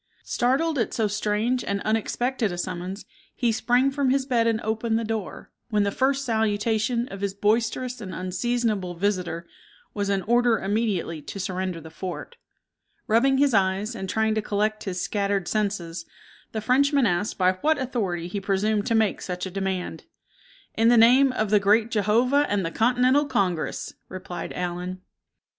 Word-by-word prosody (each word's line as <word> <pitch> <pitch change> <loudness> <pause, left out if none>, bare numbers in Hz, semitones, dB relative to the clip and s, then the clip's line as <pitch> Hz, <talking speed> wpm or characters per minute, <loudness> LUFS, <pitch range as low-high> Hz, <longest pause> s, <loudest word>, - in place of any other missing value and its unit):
Startled 275 +5 +1
at 230 - -1
so 220 -2 +1
strange 215 +4 0
and 200 0 -1
unexpected 225 +1 0
a 175 - -5
summons, 185 +2 -5 0.3
he 240 -2 +1
sprang 245 +4 +2
from 275 -1 0
his 265 0 +2
bed 235 -4 +2
and 225 -1 +1
opened 225 +1 0
the 230 - -1
door, 220 -3 -5 0.2
when 210 -3 +2
the 200 - 0
first 270 +4 +1
salutation 220 +1 0
of 195 0 -8
his 200 -1 -2
boisterous 230 +4 0
and 190 -3 -6
unseasonable 195 0 -1
visitor 180 -3 -1 0.5
was 200 -1 -2
an 195 -1 0
order 240 0 +3
immediately 195 -6 -1
to 200 - -8
surrender 185 -2 -3
the 160 0 -11
fort. 185 - -7 0.7
Rubbing 265 +5 +3
his 280 -2 +3
eyes, 195 +3 +1
and 190 -4 -5
trying 220 +1 +1
to 215 - 0
collect 215 +1 -1
his 185 -2 -3
scattered 200 -1 -1
senses, 190 -6 -2 0.5
the 220 - -3
Frenchman 275 +4 +3
asked 190 +1 0
by 185 -1 +4
what 315 +1 +3
authority 205 -10 -2
he 200 +3 -4
presumed 205 +2 0
to 230 - +2
make 220 -2 +1
such 180 0 -4
a 190 - -6
demand. 190 -1 -3 0.7
"In 225 +1 +2
the 240 0 +6
name 255 +4 +6
of 215 -4 -1
the 210 - +6
Great 215 +3 +3
Jehovah 240 +7 +2
and 200 -3 0
the 165 - -2
Continental 250 +6 +3
Congress!" 190 - -1 0.2
replied 185 -1 -6
Allen. 180 +1 -4
215 Hz, 165 wpm, -25 LUFS, 190-240 Hz, 0.7 s, the